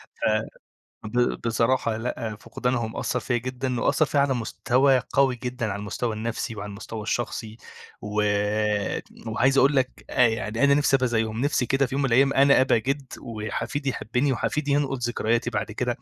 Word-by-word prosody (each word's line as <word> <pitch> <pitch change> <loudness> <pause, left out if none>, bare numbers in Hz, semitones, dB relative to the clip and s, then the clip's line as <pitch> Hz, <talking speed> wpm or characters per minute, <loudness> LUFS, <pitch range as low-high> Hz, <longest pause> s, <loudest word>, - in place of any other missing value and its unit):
ف - - -4 0.8
ب 120 +3 0
بصراحة 115 0 +1
لأ، 110 -1 -4
فقدانهم 120 +1 -3
أثَّر 125 - -1
فيَّا 125 - -1
جدًا 125 0 -3
وأثَّر 155 - +3
فيَّا 145 - +1
على 140 -1 +2
مستوى 130 +2 +2
قوي 135 -2 +3
جدًا 125 -2 -2
على 100 - -5
المستوى 110 +2 -3
النفسي 115 +1 -3
وعلى 100 0 -6
المستوى 105 +2 -7
الشخصي، 110 0 -3 0.5
وت 105 0 0 0.2
وعايز 130 +5 +2
اقول 140 +2 +4
لك 130 -1 -1
أ 125 -2 +5
يعني 110 +2 -1
أنا 140 0 +5
نفسي 140 -1 +3
ابقى 130 -1 0
زيهم، 110 -1 -1
نفسي 140 -2 +1
كده 135 +2 +2
في 130 - -7
يوم 140 - 0
من 135 - +1
الأيام 135 +3 +4
أنا 140 +1 +5
أبقى 130 -3 +3
جِدّ، 135 +4 -2
وحفيدي 115 +6 -4
يحبني 125 +3 -1
وحفيدي 145 +3 -1
ينقل 140 -2 +1
ذكرياتي 120 -1 0
بعد - - -3
كده، - - -2
125 Hz, 170 wpm, -25 LUFS, 110-135 Hz, 0.8 s, أ